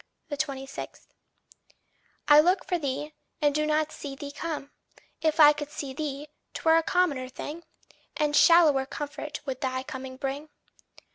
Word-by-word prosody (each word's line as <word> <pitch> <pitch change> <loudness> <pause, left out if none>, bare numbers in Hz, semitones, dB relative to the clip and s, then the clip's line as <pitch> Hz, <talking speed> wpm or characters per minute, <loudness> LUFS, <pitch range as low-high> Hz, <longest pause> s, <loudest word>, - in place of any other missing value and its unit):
26. 275 -2 -5 1.2
I 295 0 +8
look 360 +5 +3
for 360 -2 -1
thee, 295 +1 -3 0.3
and 290 -1 +2
do 305 +1 0
not 310 0 +1
see 280 -3 -7
thee 285 +1 -7
come. 290 -2 -5 0.5
If 315 0 +1
I 300 -1 +9
could 295 -1 -6
see 280 -2 -6
thee, 290 0 -4 0.3
'twere 320 0 +4
a - - +4
commoner 315 -7 0
thing, 295 +5 -7 0.6
And 300 -1 +1
shallower 305 -7 +6
comfort 295 0 -6
would 260 -2 -4
thy 260 -1 -2
coming 260 0 -7
bring. 275 +3 -4
295 Hz, 145 wpm, -27 LUFS, 275-310 Hz, 1.2 s, I